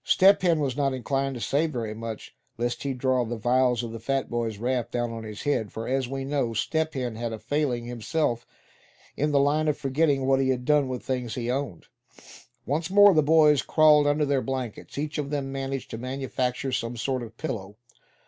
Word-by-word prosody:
Step 195 +2 +5
Hen 170 -4 +3
was 135 -4 -1
not 140 -2 0
inclined 135 +2 -1
to - - -5
say 145 +7 +1
very 115 -8 -4
much, 115 0 -7 0.2
lest 120 +1 -2
he 140 - -2
draw 130 -1 +1
the 120 0 -4
vials 125 +1 +2
of 115 - -5
the 115 - -6
fat 135 +3 -2
boy's 115 -3 -2
wrath 120 +1 -1
down 120 -1 -2
on 115 -1 -6
his 105 +2 -8
own 145 - +2
head; 110 -6 -2
for 115 +1 -5
as 130 0 0
we 135 +1 -4
know, 135 -5 -1
Step 160 +9 -1
Hen 125 -4 -3
had 115 0 -3
a 110 - -4
failing 125 +1 -1
himself 120 +1 -1 0.7
in 150 +1 0
the 140 - +4
line 150 +3 +2
of 150 - +1
forgetting 140 0 +1
what 135 0 +3
he 135 -1 +1
had 125 -1 -1
done 150 -1 +3
with 125 -2 -4
things 125 -3 -3
he 120 -1 -2
owned. 130 - -3 0.8
Once 160 +5 -1
more 205 +1 +7
the 155 - +5
boys 150 -1 +5
crawled 150 -2 +5
under 145 +1 +2
their 140 -2 +1
blankets. 130 -1 -5
Each 150 +1 -3
of 140 -1 -3
them 145 -2 -2
had 135 - -6
managed 135 -1 -4
to 110 - -5
manufacture 130 0 -2
some 120 -1 -2
sort 130 +2 -1
of 120 - -5
a - - -16
pillow. 105 -9 -5
130 Hz, 220 wpm, -26 LUFS, 120-145 Hz, 0.8 s, more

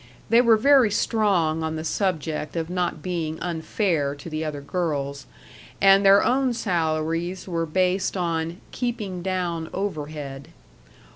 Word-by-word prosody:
They 230 +1 +7
were 230 -2 +5
very 270 -1 +5
strong 195 -7 +1
on 160 0 -2
the 155 - -4
subject 160 -4 -2
of 165 0 -3
not 180 -4 -2
being 165 -3 -3
unfair 160 -3 -1
to 145 +4 -10
the 155 +1 -2
other 150 -2 -4
girls, 140 -3 -3 0.5
and 195 0 +6
their 195 0 +6
own 255 -1 +2
salaries 170 -2 -1
were 165 -2 -2
based 185 +3 0
on 165 0 -2
"keeping 215 -7 -3
down 175 -3 -2
overhead." 150 -7 -5
170 Hz, 135 wpm, -24 LUFS, 155-195 Hz, 0.5 s, They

